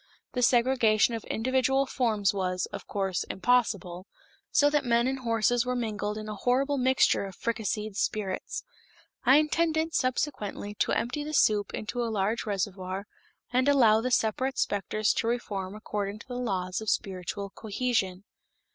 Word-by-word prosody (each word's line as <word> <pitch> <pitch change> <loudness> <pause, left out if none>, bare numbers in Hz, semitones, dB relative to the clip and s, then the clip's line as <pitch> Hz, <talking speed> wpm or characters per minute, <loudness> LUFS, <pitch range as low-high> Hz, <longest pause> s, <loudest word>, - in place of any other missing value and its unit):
The 250 - -1
segregation 240 -3 +4
of 225 -2 -4
individual 260 +3 +1
forms 220 -7 +1
was, 185 -2 -1
of - - -7
course, 195 -3 -1
impossible, 190 -5 0 0.4
so 290 - +4
that 295 0 +2
men 235 -1 +2
and 265 +1 -1
horses 230 0 +2
were 250 0 -2
mingled 210 -3 -2
in 215 0 -6
a 215 - -4
horrible 265 +6 +1
mixture 260 -5 +3
of 190 -2 -8
fricasseed 215 -2 -2
spirits. 200 -2 -2 0.6
I 265 +3 +7
intended 315 +1 +1
subsequently 245 -6 -1
to - - +2
empty 275 +5 -1
the 305 +1 -4
soup 205 -5 +3
into 240 +3 -3
a 230 - -1
large 215 +2 -1
reservoir 190 -1 -3 0.5
and 255 +3 +3
allow 225 -6 +5
the 255 - -1
separate 255 +3 +1
specters 205 +1 0
to - - -1
reform 205 -5 -3
according 205 -1 -4
to 215 - -14
the 250 - -6
laws 185 -5 -2
of 220 - -2
spiritual 195 +1 -3
cohesion. 205 -4 -2
220 Hz, 155 wpm, -28 LUFS, 200-255 Hz, 0.6 s, I